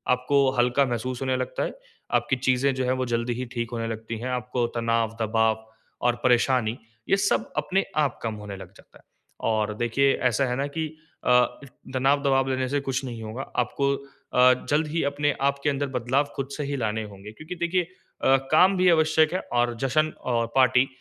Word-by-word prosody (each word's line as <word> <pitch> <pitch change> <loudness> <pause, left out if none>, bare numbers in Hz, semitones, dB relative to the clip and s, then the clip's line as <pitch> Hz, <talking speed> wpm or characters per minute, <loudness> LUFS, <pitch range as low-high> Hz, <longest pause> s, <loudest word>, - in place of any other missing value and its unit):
आपको 135 +2 +2
हल्का 125 +3 +3
महसूस 125 +1 -3
होने 130 -1 0
लगता 130 0 -2
है, - - -3 0.4
आपकी 130 - +2
चीज़ें 130 +1 +1
जो 130 -1 -1
है 125 - +1
वो 130 - 0
जल्दी 120 0 -1
ही 125 +2 -4
ठीक 120 -1 -3
होने 115 -1 -3
लगती 115 0 -5
हैं 125 - -4
आपको 125 -1 -1
तनाव, 115 -1 0
दबाव 110 0 +1 0.4
और 120 - +3
परेशानी 125 -2 +2 0.3
ये 195 - +4
सब 115 - 0
अपने 185 +6 +1
आप 145 -5 +1
कम 110 -1 -2
होने 100 -1 -6
लग - - -11
जाता - - -19
है। - - -25 0.5
और 110 -1 0
देखिए 135 +4 +2 0.2
ऐसा 125 +4 +1
है 125 0 -1
ना 140 +2 -1
कि 160 +2 -3 0.4
अ, - - +2 0.6
तनाव 135 +2 +2
दबाव 135 -1 +2
लेने 130 0 0
से 145 - +1
कुछ 135 -1 -2
नहीं 115 -3 -6
होगा 110 +4 -5 0.2
आपको 140 +3 0 0.4
अ, 125 0 +7 0.2
जल्द 150 +1 +2
ही 165 +2 -1
अपने 145 +1 +1
आप 140 0 +1
के 145 - +3
अंदर 140 0 -1
बदलाव 130 +4 +1
ख़ुद 135 -1 -3
से 150 - -2
ही 140 0 -3
लाने 110 -2 -1
होंगे 105 0 -10
क्योंकि 155 +10 -8
देखिए 175 +1 0 0.4
अ, 135 0 +5
काम 185 +5 +5
भी 180 0 +4
आवश्यक 160 0 +3
है 185 - 0 0.4
जश्न 155 +3 +1 0.2
और 115 -1 +1
पार्टी 130 0 +5
130 Hz, 195 wpm, -25 LUFS, 115-140 Hz, 0.6 s, अ